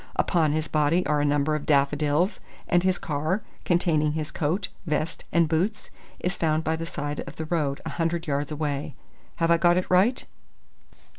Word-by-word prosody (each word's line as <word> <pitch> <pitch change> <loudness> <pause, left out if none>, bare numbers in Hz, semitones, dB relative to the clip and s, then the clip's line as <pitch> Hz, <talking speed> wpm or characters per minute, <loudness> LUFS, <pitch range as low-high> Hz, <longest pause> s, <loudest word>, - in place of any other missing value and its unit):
Upon 160 -5 +2
his 155 0 -1
body 155 +4 +2
are 150 -1 +1
a - - +1
number 145 +1 +2
of 150 -1 -3
daffodils, 145 +5 +2 0.3
and 175 - +3
his 185 0 +2
car, 160 +3 -2 0.2
containing 160 -4 +2
his 155 -1 -3
coat, 175 +5 -1 0.2
vest 155 +1 -2
and 170 -1 +3
boots, 185 +7 -1 0.3
is 180 +1 -2
found 160 -1 +1
by 160 0 0
the 165 +1 -5
side 145 -2 -4
of - - -8
the 160 - -4
road 150 -4 -1
a - - -3
hundred 165 +1 0
yards 145 0 -1
away. 145 -2 -3 0.4
Have 165 0 +1
I 170 - +6
got 175 +1 +4
it 180 - +1
right?" 195 +8 +3
160 Hz, 180 wpm, -26 LUFS, 150-175 Hz, 0.4 s, I